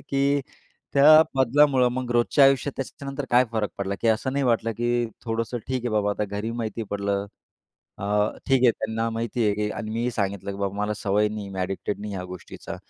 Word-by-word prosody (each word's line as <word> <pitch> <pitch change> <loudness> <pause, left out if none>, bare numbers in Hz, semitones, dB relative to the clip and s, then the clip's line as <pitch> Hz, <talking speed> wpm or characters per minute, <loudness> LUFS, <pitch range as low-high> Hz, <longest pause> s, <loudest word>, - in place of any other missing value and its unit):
की 140 +1 +1 0.5
त्या 155 +3 +8
बदलामुळं 130 0 +4
मग 125 -1 -3
रोजच्या 120 +4 +4
आयुष्यात 135 +1 +3
त्याच्यानंतर 140 +1 -5
काय 125 +1 +5
फरक 110 -2 -1
पडला? 100 0 -2
की 115 - +1
असं 115 +4 +1
नाही 140 0 0
वाटलं, 115 -2 +1
की 120 +1 0 0.2
थोडंसं 115 +1 -2
ठीक 130 0 -1
आहे - - 0
बाबा, 105 -1 +1
आता 105 - -1
घरी 105 +2 -4
माहिती 115 -1 -4
पडलं. 100 0 -1 0.7
अ, 100 - -5 0.4
ठीक 135 -2 +3
आहे. 120 - +7
त्यांना 110 +1 -2
माहिती 115 +1 -2
आहे, 105 -1 +2
की 105 0 -1
आणि 110 - -5
मीही 120 +2 -1
सांगितलं, 100 -2 -2
की 100 - -6
बाबा 100 0 -2
मला 105 +1 -1
सवय 105 +1 +1
नाही 105 0 -5
आहे. 100 - -9
मी 95 - -3
एडिक्टेड 95 +2 -3
नाही 105 0 -5
ह्या 90 -1 -4
गोष्टीचा. 90 -1 -8
115 Hz, 205 wpm, -25 LUFS, 105-130 Hz, 0.7 s, त्या